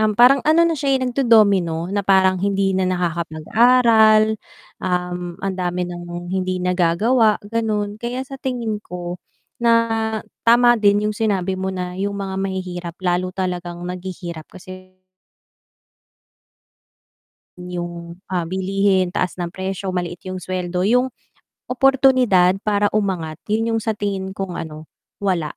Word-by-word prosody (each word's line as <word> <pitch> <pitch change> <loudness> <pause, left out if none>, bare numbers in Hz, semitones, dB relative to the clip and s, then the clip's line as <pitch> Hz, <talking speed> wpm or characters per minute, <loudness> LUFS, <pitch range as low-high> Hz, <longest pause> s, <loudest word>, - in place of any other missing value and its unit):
um, 215 -1 +2
parang 255 +3 +6
ano 320 +2 +5
na - - +1
siya 275 -1 +1
eh - - -3
nagdo-domino 200 -10 +3
na 205 - +1
parang 190 -1 +4
hindi 195 -1 +1
na 190 - +1
nakakapag-aral, 215 +6 +3 0.4
um, 180 -1 -2
ang 195 -1 -2
dami 180 0 -1
ng 175 0 -7
hindi 185 -1 -1
nagagawa 185 +6 +2
gano'n. 210 -1 -2
Kaya 245 +2 -3
sa 270 0 -9
tingin 235 -5 -2
ko 175 0 -6 0.4
na 235 -1 +4 0.7
tama 240 +1 +6
din 205 0 +3
yung 215 - -1
sinabi 195 -4 0
mo 190 0 -2
na 180 -1 -5
yung 200 +1 -1
mga 195 -1 -4
mahihirap 180 -3 -4
lalo 180 +1 +1
talagang 175 -2 -4
naghihirap 180 -3 -7
kasi 185 0 -12 2.6
yung, 175 -1 -7 0.2
ah, 170 -2 -1
bilihin, 190 -1 +1
taas 185 0 -1
ng 175 -1 -4
presyo, 190 0 -4
maliit 175 -1 -3
yung 185 0 -5
sweldo, 180 0 -3
yung 250 +4 +2 0.6
oportunidad 250 -8 +4
para 205 -1 +1
umangat 185 -7 -2
yun 225 +2 0
yung 225 - 0
sa 220 -1 -2
tingin 195 -1 -3
kong 195 -3 -4
ano 155 -1 -8 0.4
wala 170 -5 -1
190 Hz, 135 wpm, -20 LUFS, 180-215 Hz, 2.6 s, parang